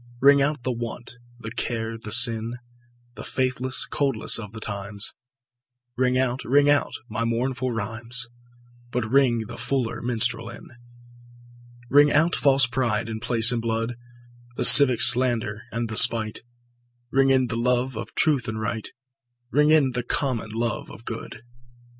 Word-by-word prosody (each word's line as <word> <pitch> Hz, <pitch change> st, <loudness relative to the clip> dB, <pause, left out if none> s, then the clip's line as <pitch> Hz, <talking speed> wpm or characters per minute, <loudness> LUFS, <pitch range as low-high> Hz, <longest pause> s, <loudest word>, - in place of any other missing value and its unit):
Ring 140 Hz, +1 st, +4 dB
out 145 Hz, -2 st, -2 dB
the 130 Hz, -, -2 dB
want, 120 Hz, +1 st, -7 dB, 0.2 s
the 115 Hz, -1 st, -9 dB
care 115 Hz, -1 st, -4 dB
the 110 Hz, -1 st, -10 dB
sin, 115 Hz, +2 st, +1 dB, 0.6 s
The 110 Hz, -, -10 dB
faithless 130 Hz, 0 st, -2 dB
coldness 135 Hz, -6 st, +1 dB
of 105 Hz, -3 st, -9 dB
the 110 Hz, -, -9 dB
times; 100 Hz, -1 st, -6 dB, 0.8 s
Ring 125 Hz, 0 st, 0 dB
out, 130 Hz, 0 st, -2 dB
ring 145 Hz, +3 st, +2 dB
out 145 Hz, -, 0 dB
my 115 Hz, +1 st, -4 dB
mournful 125 Hz, +2 st, -3 dB
rhymes, 115 Hz, +2 st, -6 dB, 0.6 s
But 120 Hz, -2 st, -3 dB
ring 125 Hz, -5 st, +1 dB
the -, -, -10 dB
fuller 125 Hz, -1 st, -3 dB
minstrel 120 Hz, -1 st, -1 dB
in. 120 Hz, -, -13 dB, 1.2 s
Ring 145 Hz, +4 st, +4 dB
out 160 Hz, +4 st, +2 dB
false 135 Hz, -2 st, +2 dB
pride 115 Hz, -4 st, -3 dB
in 110 Hz, -1 st, -6 dB
place 115 Hz, 0 st, +4 dB
and 120 Hz, -2 st, -2 dB
blood, 115 Hz, +1 st, -3 dB, 0.6 s
The -, -, 0 dB
civic 130 Hz, -5 st, +10 dB
slander 120 Hz, -4 st, +3 dB
and 115 Hz, 0 st, -4 dB
the 110 Hz, -1 st, -6 dB
spite; 110 Hz, -2 st, +5 dB, 0.7 s
Ring 135 Hz, 0 st, +2 dB
in 130 Hz, -1 st, +2 dB
the 115 Hz, -, -5 dB
love 125 Hz, +1 st, -1 dB
of 110 Hz, +1 st, -8 dB
truth 145 Hz, -7 st, +1 dB
and 110 Hz, -1 st, -5 dB
right, 110 Hz, 0 st, -5 dB, 0.6 s
Ring 150 Hz, +1 st, +2 dB
in 150 Hz, -4 st, +3 dB
the 125 Hz, 0 st, -3 dB
common 120 Hz, -2 st, -3 dB
love 115 Hz, +2 st, -4 dB
of 115 Hz, -, -14 dB
good. 115 Hz, -1 st, -8 dB
120 Hz, 155 wpm, -23 LUFS, 115-130 Hz, 1.2 s, civic